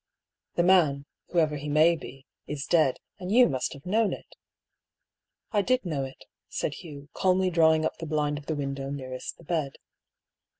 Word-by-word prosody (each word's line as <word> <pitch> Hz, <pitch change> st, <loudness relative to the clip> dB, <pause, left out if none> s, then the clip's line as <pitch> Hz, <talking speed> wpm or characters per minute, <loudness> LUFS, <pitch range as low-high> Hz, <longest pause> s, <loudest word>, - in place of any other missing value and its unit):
" -, -, -62 dB
The 175 Hz, -, +3 dB
man, 160 Hz, -7 st, +4 dB, 0.2 s
whoever 155 Hz, -4 st, +1 dB
he 145 Hz, +1 st, -5 dB
may 155 Hz, +3 st, +5 dB
be, 135 Hz, -4 st, -10 dB, 0.2 s
is 145 Hz, -2 st, -4 dB
dead, 155 Hz, -6 st, +3 dB, 0.2 s
and 185 Hz, 0 st, -5 dB
you 245 Hz, +3 st, +7 dB
must 130 Hz, -1 st, -2 dB
have 140 Hz, -, -13 dB
known 215 Hz, +3 st, +2 dB
it." -, -, -10 dB, 0.6 s
" -, -, -56 dB
I 210 Hz, -3 st, +3 dB
did 255 Hz, +2 st, +1 dB
know 150 Hz, -6 st, -1 dB
it," 135 Hz, -, -11 dB, 0.2 s
said 150 Hz, -, -2 dB
Hugh, 145 Hz, -1 st, -10 dB
calmly 185 Hz, 0 st, +2 dB
drawing 160 Hz, -2 st, +4 dB
up -, -, -2 dB
the 165 Hz, -, -5 dB
blind 150 Hz, -1 st, 0 dB
of 145 Hz, -, -16 dB
the 160 Hz, -, -1 dB
window 140 Hz, -1 st, -3 dB
nearest 130 Hz, -2 st, -6 dB
the -, -, -16 dB
bed. 155 Hz, -4 st, -1 dB
155 Hz, 185 wpm, -27 LUFS, 140-175 Hz, 0.6 s, you